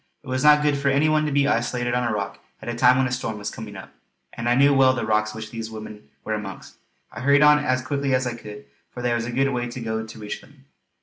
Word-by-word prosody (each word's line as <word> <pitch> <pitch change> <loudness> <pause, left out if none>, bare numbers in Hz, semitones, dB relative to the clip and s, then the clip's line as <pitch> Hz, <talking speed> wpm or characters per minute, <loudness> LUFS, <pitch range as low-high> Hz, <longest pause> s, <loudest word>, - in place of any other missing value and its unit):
It - - -16
was 130 0 -1
not 150 0 +6
good 145 -1 +1
for 140 - -1
any 140 +3 +3
one 155 0 +2
to - - -2
be 140 0 +2
isolated 120 -1 0
on 125 0 +1
a - - -1
rock 100 -2 -4 0.2
at - - -11
a 120 - -2
time 125 +1 +4
when 130 - +2
a 125 - -2
storm 125 -3 -3
was 105 0 -5
coming 110 -2 -9
up; - - -11 0.4
and 115 +1 -3
I 120 - +4
knew 140 +2 +5
well 135 -1 +5
the 120 - -3
rocks 110 0 0
which 110 0 -7
these 115 -1 -5
women 110 -6 -10
were 110 - -3
amongst. 105 -2 -7 0.3
I - - -8
hurried 140 +2 +4
on 150 0 +7
as 130 -3 0
quickly 140 -1 0
as 130 0 0
I 120 - -2
could, 105 -6 -10 0.2
for 125 - -8
there 120 -1 +1
was 115 0 -1
a - - -4
good 135 +3 +1
way 120 -1 -2
to 120 - -7
go 110 -1 -3
to 110 - -11
reach 105 -1 -6
them. 135 -1 -20
125 Hz, 285 wpm, -23 LUFS, 110-140 Hz, 0.4 s, on